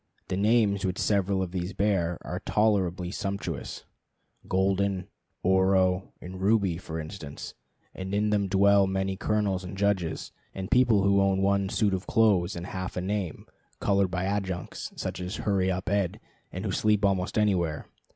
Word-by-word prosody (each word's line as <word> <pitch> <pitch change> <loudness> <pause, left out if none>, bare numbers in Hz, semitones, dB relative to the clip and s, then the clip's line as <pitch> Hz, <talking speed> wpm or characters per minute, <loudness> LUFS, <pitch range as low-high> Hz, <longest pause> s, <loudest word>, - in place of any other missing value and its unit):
The - - -1
names 105 0 +2
which 95 -1 -1
several 100 -2 +1
of 90 - -5
these 90 +1 -3
bear 90 -5 +1
are - - -4
tolerably 95 -5 +1
sumptuous: 100 -1 -4 0.6
Golden, 95 0 +1 0.4
Oro, 95 0 +3
and 95 +1 -8
Ruby, 100 -4 +2
for 80 -2 -6
instance; 80 -2 -7 0.4
and 95 0 -6
in 105 +1 +1
them 100 -1 +1
dwell 100 +1 +4
many 95 0 -1
colonels 100 -2 0
and 90 +1 -7
judges, 95 -5 0 0.2
and 95 -1 -5
people 120 -6 +4
who 100 0 +4
own 95 0 +2
one 100 0 +2
suit 105 -1 +1
of 95 +1 -3
clothes 100 -5 +3
and 85 0 -5
half 95 -1 -5
a - - 0
name 95 -3 -3 0.3
(colored 100 -2 +2
by 90 0 -2
adjuncts, 95 -3 -3
such - - -4
as 90 +3 -4
Hurry 95 -3 0
Up 95 +1 -2
Ed), 100 +1 0 0.3
and 95 +4 -5
who 100 - -1
sleep 105 +1 +2
almost 95 0 0
anywhere. 90 -7 +1
95 Hz, 160 wpm, -27 LUFS, 90-100 Hz, 0.6 s, dwell